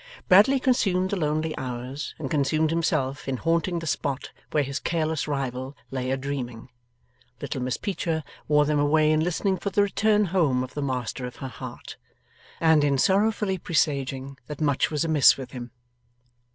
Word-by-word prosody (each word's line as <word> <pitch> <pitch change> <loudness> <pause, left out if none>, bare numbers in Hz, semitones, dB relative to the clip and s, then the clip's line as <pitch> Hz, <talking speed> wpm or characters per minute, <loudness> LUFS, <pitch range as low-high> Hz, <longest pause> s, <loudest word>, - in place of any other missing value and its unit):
Bradley 215 +9 +6
consumed 190 -8 +1
the - - +1
lonely 155 -2 -1
hours, 125 +3 -5
and 145 - -4
consumed 155 +2 +1
himself 150 -5 -1
in 135 -1 -1
haunting 165 +4 0
the 165 - -4
spot 140 -3 -2 0.2
where 150 - +1
his 140 0 -3
careless 160 -2 -1
rival 135 -1 -3
lay 130 -1 -2
a 135 - +1
dreaming; 130 -4 -5 0.7
little 135 -2 -4
Miss 125 0 -1
Peecher 170 -6 -2 0.2
wore 150 0 +4
them 150 0 +1
away 155 +1 +3
in 155 - +3
listening 180 +4 0
for 200 - -3
the 200 +1 +3
return 210 +1 +2
home 140 -9 +2
of 130 - -8
the 145 - -3
master 130 -1 -3
of 125 - -10
her 135 - -6
heart, - - -9 0.6
and 160 -2 +4
in 140 -1 +2
sorrowfully 200 - +2
presaging 140 -4 -1
that 150 - -7
much 145 -3 +1
was 155 +1 -1
amiss 155 -4 +5
with 135 -2 -8
him. 120 -1 -7
150 Hz, 170 wpm, -25 LUFS, 135-170 Hz, 0.7 s, Bradley